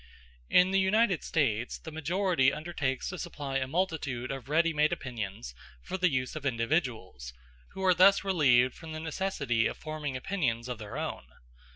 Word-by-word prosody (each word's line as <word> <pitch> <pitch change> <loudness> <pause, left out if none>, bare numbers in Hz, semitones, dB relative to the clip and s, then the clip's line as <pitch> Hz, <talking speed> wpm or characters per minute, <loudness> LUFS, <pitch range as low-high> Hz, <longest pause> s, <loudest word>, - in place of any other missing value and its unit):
In 180 +1 +5
the 195 - +3
United 195 -1 +2
States 120 -6 0
the 160 - -9
majority 160 -2 +2
undertakes 150 -4 -3
to 185 - -6
supply 145 -6 -4
a 130 -1 -1
multitude 145 -6 -2
of 135 -1 -7
ready 165 +2 +3
made 150 +1 +3
opinions 105 - -5 0.3
for - - -5
the 185 -1 +3
use 130 -1 -2
of 155 - -5
individuals, 115 - -2 0.4
who 190 - -5
are 185 - +6
thus 195 +3 +6
relieved 130 -10 +4
from 160 -1 -9
the 155 - -5
necessity 155 -9 0
of - - -5
forming 150 -3 -4
opinions 125 -8 -1
of 125 -3 -5
their 105 -2 -7
own. - - -4
150 Hz, 170 wpm, -30 LUFS, 125-175 Hz, 0.4 s, are